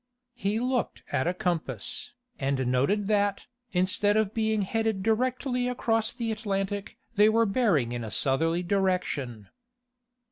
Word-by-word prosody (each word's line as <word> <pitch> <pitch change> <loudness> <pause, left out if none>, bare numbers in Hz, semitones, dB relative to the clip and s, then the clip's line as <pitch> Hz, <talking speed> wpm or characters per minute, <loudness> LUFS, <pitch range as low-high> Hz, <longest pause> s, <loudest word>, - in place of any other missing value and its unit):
He 220 -3 -1
looked 250 0 -1
at 130 - +1
a 175 - +1
compass, 160 - -2 0.3
and 135 -1 0
noted 140 +12 +1
that, 205 -1 +1 0.3
instead 205 +3 +2
of 215 -1 +1
being 220 -2 +1
headed 220 -1 -1
directly 250 +3 0
across 225 -2 +1
the 230 -2 -3
Atlantic 205 -1 -3 0.2
they 210 +1 +7
were 230 +1 +3
bearing 195 - +2
in 120 -1 -3
a 110 - -5
southerly 165 +9 +1
direction. 175 - -1
200 Hz, 135 wpm, -28 LUFS, 165-225 Hz, 0.3 s, they